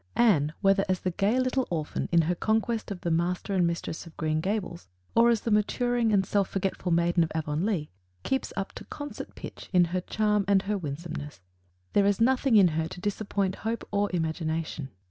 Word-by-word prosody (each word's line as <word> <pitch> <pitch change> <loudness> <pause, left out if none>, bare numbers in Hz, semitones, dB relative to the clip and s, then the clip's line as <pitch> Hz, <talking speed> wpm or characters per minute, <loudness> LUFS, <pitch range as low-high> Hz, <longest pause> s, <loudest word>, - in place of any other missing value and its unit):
Anne, 170 -12 +4
whether 195 0 +4
as 185 -1 +1
the 185 - -1
gay 205 +7 +1
little 255 0 +1
orphan 155 -3 -2
in 170 -1 +5
her 170 +3 +1
conquest 220 +4 0
of 195 -3 -6
the 170 - -1
master 175 +4 0
and 180 -3 +3
mistress 170 0 -4
of 165 - -15
Green 155 -1 0
Gables, 185 - -3 0.3
or 235 +1 +5
as 230 -3 +2
the 230 - -2
maturing 235 +2 +2
and 195 -2 +3
self 200 0 +1
forgetful 190 -1 -2
maiden 170 +1 +3
of 160 - -3
Avonlea, 160 +2 -1 0.3
keeps 265 -1 -1
up 195 0 -2
to - - -9
concert 290 -1 -7
pitch - - -9
in 180 -2 +5
her 185 - +1
charm 210 +1 +1
and 200 -1 +4
her 210 +1 -1
winsomeness. 150 - -6 0.5
There 200 -1 +4
is 200 -1 +2
nothing 255 +1 +3
in 195 -4 +7
her 160 0 -1
to 180 - -9
disappoint 200 -1 -1
hope 225 +2 -3
or 205 0 +1
imagination. 160 -3 -2
190 Hz, 195 wpm, -28 LUFS, 170-215 Hz, 0.5 s, in